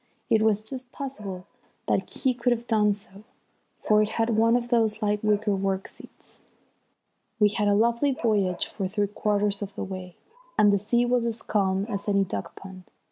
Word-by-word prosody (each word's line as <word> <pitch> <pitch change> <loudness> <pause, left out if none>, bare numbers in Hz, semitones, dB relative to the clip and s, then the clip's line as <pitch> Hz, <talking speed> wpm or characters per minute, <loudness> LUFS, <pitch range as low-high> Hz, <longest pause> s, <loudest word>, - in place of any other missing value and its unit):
It 220 -1 +4
was 215 -1 +2
just 250 +2 -7
possible 210 -10 -6 0.4
that - - 0
he 260 -2 +1
could 245 0 0
have 235 0 -1
done 210 -3 +2
so, 200 -1 -13 0.6
for 215 0 +4
it 215 - +1
had 225 0 +1
one 225 +1 +4
of 240 -1 -1
those 225 -3 +2
light 210 0 0
wicker 210 -1 +2
work 195 0 -1
seats. - - -15 1.0
We 210 -1 +5
had 210 0 -1
a 205 - +4
lovely 235 +6 +2
voyage 205 -8 0
for 195 - -4
three 205 +2 0
quarters 205 0 0
of 200 -1 -6
the - - -4
way, 185 -2 -7 0.4
and 205 -1 +5
the 200 - +3
sea 235 +4 +1
was 245 -1 +1
as 230 -1 -4
calm 195 -2 0
as 200 -3 -4
any 200 -1 +3
duck 100 - -5
pond. 190 -1 -11
210 Hz, 190 wpm, -26 LUFS, 200-230 Hz, 1.0 s, We